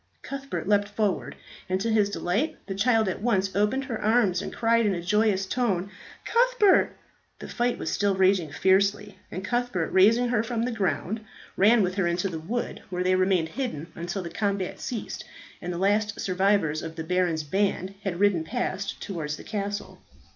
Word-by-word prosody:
Cuthbert 275 -4 -5
leapt 205 0 +3
forward, 205 -1 -1 0.3
and 185 0 +1
to 225 +3 -1
his 210 -2 +3
delight 210 - -1
the 195 - -4
child 220 +2 +2
at 190 - -3
once 195 -5 +1
opened 210 +7 +1
her 235 -5 -4
arms 210 -5 +3
and - - -5
cried 230 -1 +2
in 195 - +1
a 170 - -4
joyous 210 0 +2
tone, 200 -4 -1 0.3
"Cuthbert!" 475 -4 +3 0.4
The - - -9
fight 240 0 0
was - - -3
still 200 -1 +1
raging 190 -3 +3
fiercely, 195 +3 +1
and 190 +2 -5
Cuthbert, 240 -8 -1
raising 225 +6 +5
her 235 -3 +2
from 230 0 -2
the 250 - -1
ground, 205 0 -1 0.3
ran 215 +3 +5
with 180 0 0
her 190 -3 +2
into 175 +3 0
the 165 -3 -5
wood, 225 +10 -4
where 180 -1 -2
they 185 0 +2
remained 185 -3 +2
hidden 170 - -4
until 175 +3 -4
the 170 - -6
combat 200 -1 -2
ceased, 235 -4 -5 0.4
and 175 - -4
the 175 - -4
last 205 +2 +1
survivors 185 -5 +1
of 165 0 -7
the 165 - -4
Baron's 175 -2 0
band 190 +3 -1
had 180 -3 -3
ridden 200 -5 +3
past 190 +4 -3
towards 150 -6 -4
the - - -10
castle. 205 -1 -4
200 Hz, 185 wpm, -26 LUFS, 180-225 Hz, 0.4 s, raising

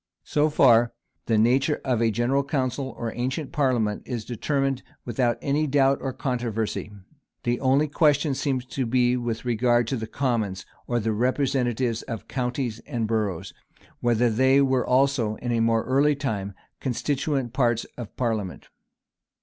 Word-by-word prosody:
So 150 +1 +1
far 120 -5 +5 0.3
the 115 - +2
nature 130 +7 +3
of 125 -4 +1
a 115 - +3
general 120 +6 +1
council 135 -1 -2
or 115 -1 -4
ancient 130 +4 -3
parliament 125 -9 +1
is 120 -4 -5
determined 135 +2 -1 0.2
without 120 0 0
any 150 +2 +1
doubt 135 -1 +3
or 135 - -2
controversy, 120 -6 -3 0.5
The 120 0 0
only 135 +3 +3
question 145 0 +2
seems 135 -2 -1
to 130 -1 -3
be 125 +1 +3
with 120 -1 -3
regard 120 0 +2
to 135 - -1
the 110 -1 -5
commons, 110 -8 -1 0.2
or 120 -1 0
the 110 0 -1
representatives 125 -1 0
of 115 -3 -7
counties 125 -2 -2
and 120 -6 -2
boroughs; 100 -5 -2 0.5
whether 120 0 +2
they 130 +4 +4
were 130 -2 +2
also, 130 -4 +2
in 120 0 -1
more 115 -1 +2
early 140 +3 +3
times, 105 -8 -3 0.2
constituent 135 0 -1
parts 120 -4 +1
of 120 -4 -9
parliament. 110 -7 -2
125 Hz, 150 wpm, -25 LUFS, 115-135 Hz, 0.5 s, far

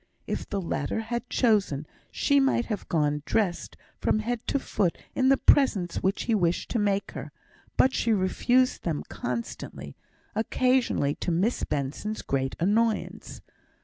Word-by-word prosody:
If - - -4
the 200 - -1
latter 165 0 -2
had 235 +2 -4
chosen, 200 - +2 0.2
she 280 0 +2
might 270 -3 +2
have 215 -4 -5
gone 150 -2 +1
dressed 185 -1 -1 0.2
from - - +2
head 230 +2 -1
to - - +1
foot 195 -9 -1 0.2
in 260 0 +3
the 270 - +5
presents 200 -14 +3
which 190 +1 0
he 230 - 0
wished 175 -5 +1
to 235 - +1
make 200 -1 0
her, - - -7 0.5
but 260 - +4
she 230 - +1
refused 245 +6 +2
them 160 -4 -2
constantly; 115 - -5 0.4
occasionally 235 - +1
to - - -2
Miss 185 +8 +1
Benson's 150 +10 -3
great 135 -1 -1
annoyance. 215 +5 0
205 Hz, 145 wpm, -27 LUFS, 165-240 Hz, 0.5 s, the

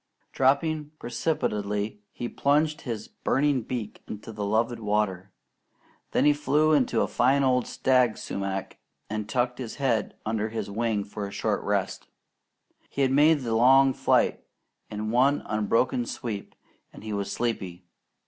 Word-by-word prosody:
Dropping 150 +3 +1
precipitately, 105 -7 -2
he 120 - -5
plunged 150 +5 +1
his 115 -4 -5
burning 140 -1 0
beak 110 -2 -5
into 105 +2 -7
the 105 -1 -5
loved 115 +3 0
water; 105 -3 -1 0.8
then - - +2
he 150 - +6
flew 150 +1 +2
into 140 -5 +2
a - - +1
fine 135 +3 +2
old 125 -2 +2
stag 125 -4 +2
sumac 95 -1 -4 0.3
and 105 -1 -3
tucked 125 +1 0
his 120 -4 -5
head 125 -6 0
under 110 0 -1
his 110 -2 -4
wing 110 -1 0
for 100 0 -6
a - - -9
short - - -1
rest. - - -2 0.8
He 140 - -1
had 130 - +2
made 150 +2 +5
the 115 -3 -2
long 135 +4 +6
flight - - +2 0.5
in 105 +1 -4
one 135 +4 +3
unbroken 110 +3 +1
sweep, 105 -5 -5 0.4
and - - -13
he 110 -1 -4
was 100 -1 -2
sleepy. 95 -7 -3
115 Hz, 150 wpm, -26 LUFS, 105-135 Hz, 0.8 s, he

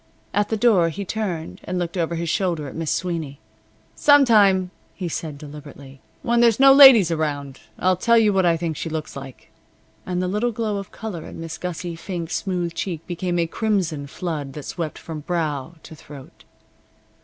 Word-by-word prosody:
At 205 0 +1
the 220 - 0
door 205 -7 +4
he 200 +5 -6
turned 180 -6 -4
and 185 - -4
looked 175 0 -3
over 170 -1 -1
his 170 0 -3
shoulder 165 -4 -1
at 135 - -8
Miss 165 -2 -3
Sweeney. 165 -6 -3 0.5
"Some 285 -1 +5
time," 195 -5 +4 0.2
he 185 - -4
said, 155 -2 -5
deliberately, 145 -2 -12 0.2
"when 235 0 +2
there's 235 -1 +4
no 270 0 +8
ladies 260 - +9
around, 145 -4 -3 0.2
I'll 185 0 +2
tell 235 +5 +3
you 215 -2 +4
what 190 -1 +2
I 170 -2 +3
think 165 -1 -3
she 165 - -4
looks 155 -1 -5
like." 135 -2 -10 0.5
And 180 -1 -3
the 180 - -1
little 210 +6 0
glow 215 -2 -2
of 195 -1 -7
color 205 -8 -6
in - - -10
Miss 165 -1 -7
Gussic 175 -1 -5
Fink's 170 -2 -4
smooth 180 -3 -3
cheek 170 -4 -4
became 175 0 -3
a 170 - +2
crimson 170 -6 -1
flood 150 -3 -5
that 150 - -7
swept 165 -3 -5
from 160 -2 -7
brow 155 -1 -3
to - - -11
throat. 140 -2 -14
175 Hz, 190 wpm, -22 LUFS, 155-200 Hz, 0.5 s, ladies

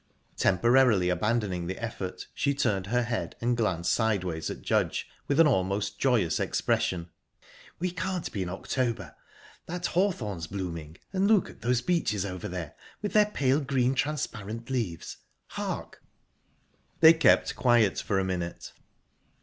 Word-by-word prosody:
Temporarily 115 -2 +4
abandoning 95 -2 0
the 95 - -4
effort, 95 -6 -5
she 140 -1 0
turned 100 -8 0
her 120 +3 +1
head 120 -1 -3
and 120 +1 +1
glanced 90 -7 0
sideways 95 -8 0
at - - -7
Judge, - - 0 0.2
with 145 +2 +1
an 165 - +8
almost 100 -6 0
joyous 115 -11 +2
expression. 85 -2 0 0.7
"We 180 +1 -2
can't 180 +1 -3
be 100 - -3
in 90 - -2
October. 115 +5 -2 0.5
That 175 +1 -4
hawthorn's 120 - -1
blooming...and 90 - -3
look 215 -4 +3
at - - -19
those 120 +1 +1
beeches 110 - 0
over 90 -2 -5
there, 90 -4 -5 0.3
with 205 - -2
their 210 -1 +5
pale 140 -8 +1
green, 135 -3 +1
transparent 115 -5 -3
leaves...Hark!..." 110 -11 -5 1.0
They 160 0 +10
kept 160 - +3
quiet 120 -6 +3
for 100 - -1
a 95 - +2
minute... 90 -2 -4
115 Hz, 135 wpm, -28 LUFS, 95-135 Hz, 1.0 s, They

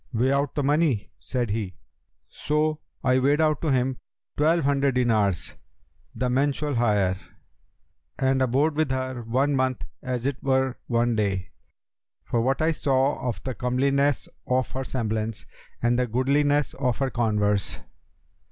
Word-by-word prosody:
'Weigh 125 +2 +1
out 140 0 0
the 145 - 0
money,' 145 -6 +1
said 120 -5 -2
he. 100 -5 -3 0.5
So 155 +1 -1 0.2
I 130 0 +3
weighed 140 +3 +3
out 155 -2 +2
to 160 - 0
him 130 0 +1 0.4
twelve 160 +2 +3
hundred 140 -1 +2
dinars, 105 - +1 0.6
the 125 - -1
mensual 140 +3 0
hire, 105 -6 +2 1.0
and 130 0 +2
abode 135 +5 +2
with 155 -2 +1
her 130 -1 -2
one 130 +5 +1
month 130 -1 0 0.2
as 125 -1 -3
it 140 -1 -2
were 130 -1 +1
one 120 -1 +1
day, 100 -2 -1 0.7
for 115 - 0
what 135 +5 +1
I 160 - +3
saw 135 -2 +1
of 115 - -5
the 130 - -3
comeliness 135 +3 +1 0.2
of 130 0 +1
her 130 - -3
semblance 110 -4 -3 0.4
and 120 +1 +3
the 125 - +1
goodliness 145 +4 +2
of 125 -4 -1
her 135 -1 -1
converse. 105 -4 0
130 Hz, 145 wpm, -25 LUFS, 120-140 Hz, 1.0 s, I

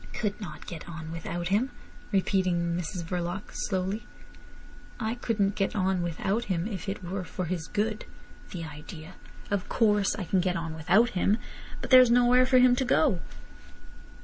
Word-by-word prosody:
"Could 215 -3 -2
not 155 -6 -8
get 170 -1 -8
on 160 -1 -7
without 170 +1 -4
him!" 215 +7 +2 0.4
repeated 190 -2 +2
Mrs 170 +1 -2
Verloc 175 +3 -4
slowly. 190 +3 -2 0.9
"I 220 -1 -1
couldn't 215 -4 0
get 195 -1 -1
on 190 -2 +1
without 190 +7 -1
him 180 -3 -1
if 195 -3 -5
it 195 - -5
were 185 +2 -3
for 180 +1 -4
his 165 -1 -3
good! 215 +1 -1 0.4
The 170 -2 -6
idea! 160 +2 -9 0.4
Of 200 -2 -1
course, 210 -3 +2
I 205 - -4
can 185 +2 +1
get 180 0 +1
on 165 -2 -3
without 180 +9 +3
him. 195 +3 +2 0.4
But - - -6
there's 255 -2 +9
nowhere 245 +1 +5
for 255 - +5
him 250 0 +6
to 265 - +2
go." 175 -6 +3
190 Hz, 165 wpm, -28 LUFS, 170-215 Hz, 0.9 s, there's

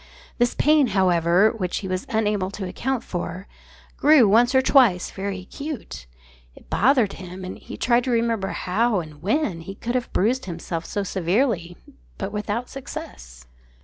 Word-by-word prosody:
This 240 0 +2
pain, 300 -2 +4
however, 180 +2 +4
which 185 -6 -3
he 190 - -4
was 185 0 -3
unable 210 -4 0
to 195 -1 -5
account 260 +6 -2
for, 180 +2 -5 0.5
grew 290 -6 +6
once 240 +6 +4
or 260 - +6
twice 235 -12 +4
very 195 -1 -4
acute. 275 - -7 0.5
It - - -19
bothered 245 -2 +3
him; 185 0 -8
and 185 - -7
he - - -9
tried 240 0 +2
to - - -2
remember 230 -4 +1
how, 210 +4 0
and 155 -3 -9
when, 205 - 0
he 195 +4 -8
could 240 +4 -4
have 250 -1 -2
bruised 245 +7 +1
himself 170 -2 -5
so 205 - -2
severely, 185 -1 0 0.4
but - - -4
without 210 +3 -2
success. - - -9
205 Hz, 160 wpm, -23 LUFS, 180-240 Hz, 0.5 s, grew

